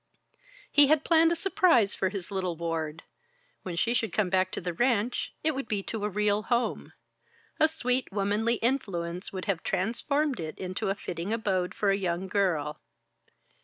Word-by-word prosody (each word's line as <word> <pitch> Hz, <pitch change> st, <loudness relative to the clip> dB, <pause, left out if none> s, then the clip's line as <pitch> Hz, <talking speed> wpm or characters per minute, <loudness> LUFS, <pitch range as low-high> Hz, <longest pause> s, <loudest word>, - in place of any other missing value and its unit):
He 290 Hz, -1 st, +7 dB
had 310 Hz, +1 st, +3 dB
planned 330 Hz, 0 st, +5 dB
a -, -, +2 dB
surprise 340 Hz, -, +3 dB
for 190 Hz, -, 0 dB
his 195 Hz, -1 st, -6 dB
little 185 Hz, -3 st, -1 dB
ward. 165 Hz, -1 st, -3 dB, 0.6 s
When 180 Hz, -2 st, -5 dB
she 235 Hz, +7 st, +1 dB
should 225 Hz, -4 st, 0 dB
come 195 Hz, -2 st, 0 dB
back 185 Hz, 0 st, +2 dB
to -, -, -2 dB
the 175 Hz, -1 st, -3 dB
ranch, 240 Hz, +2 st, 0 dB
it 315 Hz, 0 st, +2 dB
would 270 Hz, -3 st, -4 dB
be 205 Hz, -2 st, -1 dB
to 220 Hz, 0 st, -4 dB
a 210 Hz, -, 0 dB
real 210 Hz, +1 st, +1 dB
home. 240 Hz, +2 st, -1 dB, 0.7 s
A 315 Hz, -, +6 dB
sweet, 255 Hz, -6 st, -1 dB
womanly 210 Hz, +4 st, +1 dB
influence 190 Hz, -8 st, -2 dB
would 185 Hz, -1 st, -5 dB
have 185 Hz, -5 st, -1 dB
transformed 255 Hz, +9 st, 0 dB
it 155 Hz, -2 st, -5 dB
into 185 Hz, +1 st, -3 dB
a 195 Hz, -, 0 dB
fitting 175 Hz, -1 st, -5 dB
abode 190 Hz, -5 st, -1 dB
for 200 Hz, -2 st, +2 dB
a 195 Hz, -, +2 dB
young 185 Hz, -1 st, -2 dB
girl. 165 Hz, -7 st, 0 dB
200 Hz, 175 wpm, -28 LUFS, 180-245 Hz, 0.7 s, He